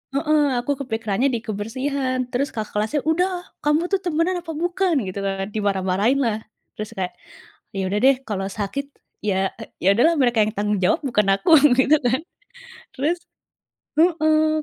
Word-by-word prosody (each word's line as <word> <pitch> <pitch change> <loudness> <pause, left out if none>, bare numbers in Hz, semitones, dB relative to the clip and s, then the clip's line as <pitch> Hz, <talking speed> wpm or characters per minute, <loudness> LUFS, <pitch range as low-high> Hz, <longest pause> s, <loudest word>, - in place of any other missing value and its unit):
heeh 305 +1 +3 0.2
aku 285 - -2
kepikirannya 225 +1 0
di 235 - 0
kebersihan 255 +5 -2
terus 270 +3 0
kakak 215 -1 -4
kelasnya, 220 +8 0
"Udah, 360 +2 0 0.2
kamu 300 +4 +2
tuh 390 - +2
temenan 350 +2 0
apa 330 - -6
bukan?" 350 +2 0
Gitu 185 +2 -5
kan, 195 0 -2
dimarah-marahin 200 +4 +1
lah. 230 -5 0 0.4
Terus 215 0 -6
kayak, 185 -1 -2 0.6
ya 195 - -1
udah 205 - +1
deh 270 +1 +6
kalau 195 -2 -2
sakit 210 +8 -4 0.4
ya 195 -1 +1 0.3
ya 195 +2 +5
udahlah 325 +9 +4
mereka 240 -3 +3
yang 215 - -4
tanggung 205 0 0
jawab, 210 - +3
bukan 210 -7 +1
aku 195 +11 0 0.2
gitu 270 +4 +5
kan. 255 +4 +2 0.8
Terus 305 +6 0 0.8
heeh. 310 -2 +3
255 Hz, 155 wpm, -22 LUFS, 210-310 Hz, 0.8 s, deh